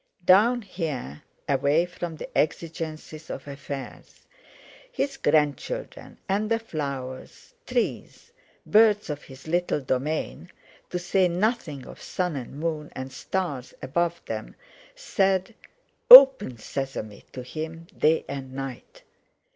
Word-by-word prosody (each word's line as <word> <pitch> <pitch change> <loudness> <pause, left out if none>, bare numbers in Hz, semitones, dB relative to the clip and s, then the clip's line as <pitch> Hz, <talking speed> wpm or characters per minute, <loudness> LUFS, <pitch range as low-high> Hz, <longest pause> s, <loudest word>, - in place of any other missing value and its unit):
Down 225 +7 +5
here—away 150 - -2
from 175 -2 -6
the - - -10
exigencies 155 0 -3
of 135 - -7
affairs—his 275 - -8
grandchildren, 155 - -1
and 205 +2 0
the 230 - +2
flowers, 140 - -6
trees, 470 - -3 0.3
birds 210 -4 +4
of 145 - -5
his 135 +2 -14
little 175 -1 0
domain, 145 +6 -3 0.4
to 180 - -2
say 180 +1 +2
nothing 175 - -1
of - - -12
sun 180 -4 -2
and 135 +1 -7
moon 155 -2 -3
and 130 0 -6
stars 140 -3 -4
above 170 +4 -1
them, 110 - -6 0.4
said, 190 +1 0 0.6
"Open, 265 - +10
sesame," 110 -3 -5
to 125 - -7
him 160 +5 -6
day 160 +1 +2
and 135 -2 -6
night. 135 - -8
160 Hz, 110 wpm, -25 LUFS, 135-190 Hz, 0.6 s, Open